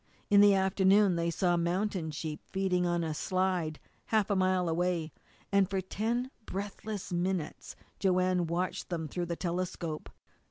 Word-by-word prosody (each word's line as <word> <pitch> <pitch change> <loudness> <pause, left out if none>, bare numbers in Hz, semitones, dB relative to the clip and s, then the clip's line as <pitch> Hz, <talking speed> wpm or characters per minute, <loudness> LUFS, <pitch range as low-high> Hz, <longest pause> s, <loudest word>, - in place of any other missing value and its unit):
In 200 0 +8
the 205 -1 +7
afternoon 190 0 +4
they 170 0 0
saw 175 +1 +1
mountain 175 0 -1
sheep 155 0 -4
feeding 185 -2 +1
on 175 -1 +1
a 160 -1 -2
slide 180 -2 -1 0.3
half 215 -2 +2
a - - +3
mile 185 -1 +2
away, 170 -1 0 0.4
and 200 -1 +3
for 195 -1 0
ten 230 +7 -2 0.2
breathless 200 0 -5
minutes 175 -2 -2 0.2
Joanne 185 -2 +2
watched 175 +2 -2
them 165 -3 -2
through 175 +3 -3
the 170 - -2
telescope. 175 -3 -3
185 Hz, 150 wpm, -31 LUFS, 170-195 Hz, 0.4 s, In